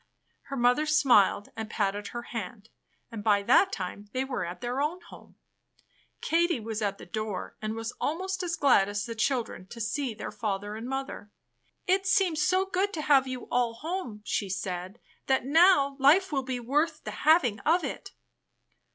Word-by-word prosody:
Her 275 0 -5
mother 250 +5 +3
smiled 250 -9 +4
and 220 -1 -5
patted 205 -2 -1
her 240 0 -6
hand, 220 -2 -7 0.4
and 220 -3 -6
by 205 -2 +3
that 380 - +4
time 200 +2 -6
they 260 0 0
were 265 -2 -3
at 175 +1 -6
their 245 +3 -2
own 315 +5 -1
home. - - -15 0.9
Katie 340 -3 +1
was 220 0 -4
at 200 -1 -1
the - - -11
door 215 +1 -5
and 215 0 -3
was 225 +1 -4
almost 375 +5 -2
as 345 -2 -2
glad 245 -10 +4
as 205 +1 -3
the 235 - -5
children 225 -5 -2
to 230 - -10
see 235 +2 -2
their - - -6
father 205 -1 -3
and 225 +2 -6
mother. 270 -6 -5 0.6
"It 380 +1 +1
seems 370 -6 +2
so 370 +4 +2
good 390 +2 -1
to 310 - -3
have 275 -3 +4
you 255 -1 -6
aU 245 -2 +1
home," 255 - -5
she 205 -1 -1
said, 185 +2 -4 0.3
"that 265 -2 +2
now 290 -2 +5
life 320 +8 +5
will 275 -2 0
be 255 -1 -3
worth 295 +7 0
the - - -5
hving 280 -10 +3
of 340 +2 +3
it." - - -5
245 Hz, 180 wpm, -28 LUFS, 210-305 Hz, 0.9 s, now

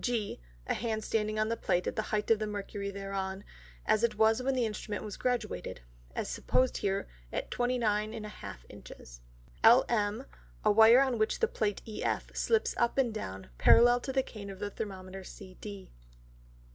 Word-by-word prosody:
G, 230 - -1 0.2
a - - 0
Hand 220 -2 -2
standing 215 0 -1
on 215 0 +1
the 230 - 0
Plate 180 -5 0
at - - -2
the 215 - +1
height 210 0 0
of 220 - +5
the 215 - -2
Mercury 200 -1 -4
thereon, 195 0 -4 0.4
as 220 - +2
it 235 - +2
was 220 +2 +4
when 265 +1 0
the 250 -2 +2
Instrument 210 -1 -4
was 210 - -6
graduated, 245 - -2 0.3
as - - -2
suppose 255 0 +1
here 195 0 -1 0.2
at - - -4
29½ 215 - -1
Inches. - - -12 0.4
LM, 230 0 +4 0.4
a 210 - +6
Wire 225 +4 +8
on 260 -4 +1
which 215 - +1
the 455 - +3
Plate 210 - -2
EF, 215 - -3
slips 450 -1 +1
up 235 +2 +1
and 250 -4 +2
down, 95 - -6
parallel 240 +1 +7
to 265 - -4
the 265 0 +2
Cane 205 -5 -9
of 195 - -7
the 205 +1 -4
Thermometer 190 -3 -6
CD. 195 +1 -10
215 Hz, 170 wpm, -31 LUFS, 200-235 Hz, 0.4 s, Wire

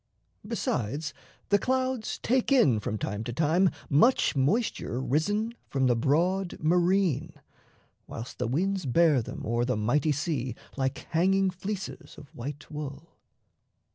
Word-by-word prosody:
Besides, 145 +7 -2 0.4
the 205 - +4
clouds 260 -1 -1
take 255 +3 0
in 145 - +5
from 105 +1 -3
time 105 0 -3
to 120 - -4
time 165 +8 +3 0.2
Much 170 - +4
moisture 140 - 0
risen 205 - 0 0.2
from 135 -1 +1
the 125 -2 +4
broad 175 +9 +1
marine, 170 -2 +2 0.7
Whilst 115 +2 -8
the 125 - 0
winds 185 - 0
bear 150 0 +4
them - - -7
o'er 120 +2 0
the 125 -2 0
mighty 135 +8 +2
sea, 140 -5 -2 0.2
Like 135 +1 -2
hanging 190 +3 +3
fleeces 190 -4 -6
of 145 -2 -13
white 145 +6 -7
wool. 150 +1 -7
155 Hz, 135 wpm, -28 LUFS, 130-190 Hz, 0.7 s, in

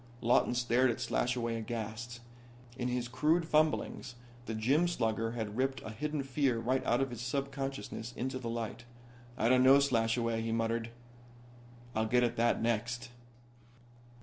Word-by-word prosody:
Lawton 120 +1 +3
stared 125 +1 +3
at 115 - -2
Slashaway 120 -2 0
aghast. 115 +1 -5 0.5
In 125 -1 -2
his 125 -1 -1
crude 155 +7 +1
fumblings 155 -5 +1 0.3
the 110 - -3
gym 135 +10 +3
slugger 115 -7 -1
had 110 -3 -4
ripped 135 +2 0
a 110 - -6
hidden 150 +6 -3
fear 135 -2 +1
right 130 +3 0
out 120 +2 +3
of 135 -1 -1
his 120 -2 -6
subconsciousness 135 -3 -4
into 130 +1 -2
the 120 -2 -4
light. 115 0 -4 0.5
"I 115 - +2
don't 125 +1 +5
know, 135 +2 +8
Slashaway," 115 -3 +1
he 115 0 -2
muttered. 115 0 -1 1.0
"I'll 110 0 0
get 125 +2 +3
at 120 -1 +1
that 115 0 +2
next." 120 +2 -1
120 Hz, 150 wpm, -32 LUFS, 115-130 Hz, 1.0 s, know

